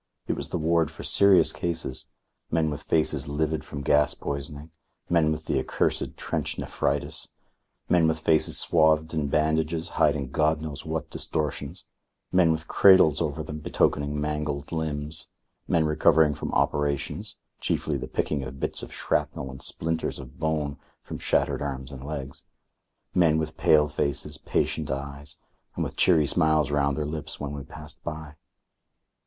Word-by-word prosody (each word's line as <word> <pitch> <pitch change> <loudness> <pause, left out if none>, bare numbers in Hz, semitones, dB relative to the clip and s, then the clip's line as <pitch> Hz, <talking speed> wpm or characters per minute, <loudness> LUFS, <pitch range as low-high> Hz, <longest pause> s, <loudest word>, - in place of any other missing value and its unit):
It - - 0
was - - -4
the - - -1
ward 80 -1 +2
for 80 - -10
serious 100 -2 +5
cases 80 -6 -3 0.4
men 80 -1 +1
with 75 0 -5
faces 80 -2 +1
livid 75 +2 -1
from 70 0 -7
gas 75 +2 +3
poisoning, 75 +2 -5 0.4
men 80 -3 +4
with 80 0 -4
the - - +1
accursed - - -1
trench - - -2
nephritis, - - -1 0.6
men 85 -2 +4
with 80 0 +1
faces 80 0 +2
swathed 80 -1 +3
in 75 -2 0
bandages 80 +2 +1
hiding 70 -3 +2
God 75 +1 +2
knows 75 -3 -6
what - - -3
distortions, 75 -3 -3 0.5
men 90 -3 +5
with 80 0 -2
cradles 95 -6 +6
over 80 -1 -2
them 75 0 -6
betokening 75 -1 0
mangled 75 -1 -3
limbs, 75 -1 -2 0.4
men 80 -2 +2
recovering 75 0 +4
from - - -5
operations, 75 -1 -1 0.2
chiefly - - -1
the - - -4
picking 75 -3 -1
of 65 +1 -8
bits - - -1
of - - -8
shrapnel 65 -1 -2
and 65 +1 -10
splinters 80 +4 -2
of 65 0 -11
bone 75 -2 -1 0.2
from - - -7
shattered - - +1
arms 65 -2 -4
and 65 -1 -8
legs; 70 -2 -6 0.7
men 80 -3 +4
with 80 -1 -2
pale 75 -1 +4
faces, 70 -1 -2
patient - - -1
eyes, 70 +2 -5 0.4
and - - -1
with - - -5
cheery 80 -5 +4
smiles 75 0 +2
round 70 -1 +1
their 75 - -1
lips 75 0 -5
when 70 -1 -4
we 70 -1 -5
passed 75 +4 -11
by. 80 -2 -6
75 Hz, 155 wpm, -26 LUFS, 70-80 Hz, 0.7 s, cradles